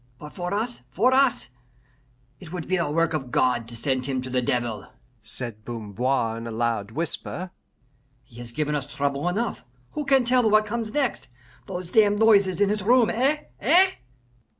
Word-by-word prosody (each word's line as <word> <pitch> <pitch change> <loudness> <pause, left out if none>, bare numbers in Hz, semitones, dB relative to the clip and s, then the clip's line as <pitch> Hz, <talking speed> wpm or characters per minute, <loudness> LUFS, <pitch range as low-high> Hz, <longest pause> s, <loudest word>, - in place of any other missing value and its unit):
"But 150 +3 -11
for 180 -1 -4
us 225 +4 -2
for 220 - +2
us!" 265 - +2 0.9
"It 170 -4 -12
would 175 -3 -5
be 185 - +1
a 170 -4 -1
work 165 +2 +1
of 135 -5 -3
God 120 -2 +1
to 120 - -9
send 130 +2 -2
him 135 -2 -1
to 130 - -7
the 125 0 +1
devil," 120 -3 -2 0.3
said 110 0 0
Bamboir 115 +1 -2
in 115 - -7
a - - -5
loud 115 -3 -1
whisper. 170 +6 -2 0.7
"He 120 - -18
has 120 -1 -7
given 150 +3 -1
us 145 -2 -2
trouble 140 +3 -1
enough. 215 - -2 0.3
Who 300 - -3
can 270 -2 +3
tell 245 -2 +3
what 215 0 +4
comes 225 0 -3
next? 275 -2 -1 0.4
Those 180 -2 -5
damned 205 -2 +4
noises 200 -5 +4
in 205 -1 +3
his 210 0 -1
room, 235 +3 +4
eh 270 +6 +1 0.2
eh?" 365 +6 +5
170 Hz, 180 wpm, -25 LUFS, -, 0.9 s, eh